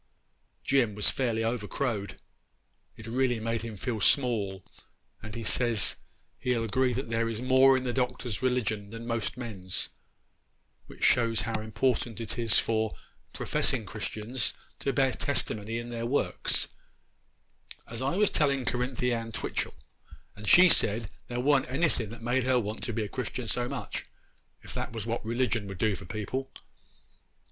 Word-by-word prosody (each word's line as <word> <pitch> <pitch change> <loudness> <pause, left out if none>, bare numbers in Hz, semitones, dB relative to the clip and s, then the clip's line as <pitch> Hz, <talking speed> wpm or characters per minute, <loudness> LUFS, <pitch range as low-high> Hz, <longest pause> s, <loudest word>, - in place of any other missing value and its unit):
Jim 120 -7 +2
was 105 - +4
fairly 115 -4 0
over 115 -2 -1
crowed—it 110 -2 -6
really 120 +1 +1
made 115 0 -1
him 115 -2 -6
feel 110 +1 -3
small, 105 -8 +2 0.6
and 110 0 -8
he 115 - -4
says 115 -2 +2 0.4
he'll 125 -2 0
agree 125 +4 +2
that 125 -1 -3
there 115 0 +1
is 110 -1 -3
more 130 +1 +6
in 130 - -2
the 125 -1 -1
Doctor's 125 -4 -1
religion 110 -5 0
than 115 +2 -7
most 115 -1 -2
men's, 100 -7 -2 1.0
which - - -10
shows 115 -2 +4
how 110 -1 -2
important 115 +1 0
it 115 +1 -3
is 115 -3 +4
for 110 -1 +1 0.4
professing - - +1
Christians 110 +3 -2 0.2
to 140 - 0
bear 135 -1 +3
testimony 115 -5 -2
in 120 +1 -5
their 115 0 -3
works—as 120 -2 -3
I 135 +5 0
was 210 +1 +3
telling 140 -4 +1
Cerinthy 125 0 0
Ann 115 -1 -3
Twitchel, 105 - -3 0.6
and 105 0 -9
she 185 +1 +9
said 110 - +4 0.2
there 120 0 -3
wa'n't 135 0 +3
anything 130 -6 0
made 125 +2 +1
her 130 -1 +4
want 105 -1 -4
to - - -2
be 110 0 -1
a - - -3
Christian 125 +1 -4
so 120 +2 0
much, 125 -7 -5 0.6
if - - -7
that - - -4
was 110 -2 -4
what 115 +1 -2
religion 115 -2 0
would 95 -1 -6
do 105 +2 +2
for 95 - -9
people. 110 +7 -4
115 Hz, 155 wpm, -29 LUFS, 110-130 Hz, 1.0 s, she